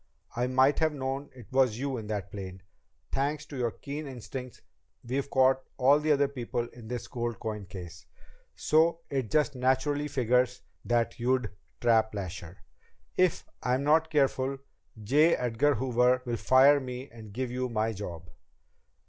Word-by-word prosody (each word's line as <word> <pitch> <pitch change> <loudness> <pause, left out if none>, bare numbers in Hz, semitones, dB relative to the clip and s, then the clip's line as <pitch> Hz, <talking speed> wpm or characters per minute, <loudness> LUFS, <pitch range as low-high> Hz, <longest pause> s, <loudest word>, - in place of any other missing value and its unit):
"I 120 +1 0
might 130 +2 +3
have 160 -1 +2
known 135 +1 -3
it 125 -4 -12
was 130 -4 +3
you 135 +1 -2
in 110 -2 -6
that 100 -3 -4
plane. 95 -2 -7 0.5
Thanks 145 +2 -1
to 145 - -10
your 125 -3 0
keen 145 +5 -7
instincts, 125 0 -8 0.4
we've 135 +3 -2
caught 130 0 +4 0.2
all 140 +3 +5
the 155 +1 +1
other 140 -1 +4
people 120 -3 -3
in 120 -2 -13
this 120 +1 -5
gold 120 -2 -3
coin 105 -3 -5
case, 85 -4 -10 0.5
so 165 +2 +2
it 130 -6 -1
just 150 +2 +2
naturally 130 +3 +1
figures 125 -2 +1 0.2
that 120 0 0
you'd 125 -2 +1 0.3
trap 110 -2 +3
Lasher. 90 -1 -7 0.5
If 185 -2 +2 0.2
I'm 125 +2 0
not 160 +2 +3
careful, 135 -2 +1 0.5
J. 150 +9 +4
Edgar 125 +4 +1
Hoover 125 0 +2
will 120 -1 -2
fire 135 +4 +6
me 125 0 -6
and 110 -2 -11
give 125 +3 -3
you 125 0 -2
my 110 -1 0
job." 90 -4 -7
125 Hz, 155 wpm, -29 LUFS, 115-140 Hz, 0.5 s, fire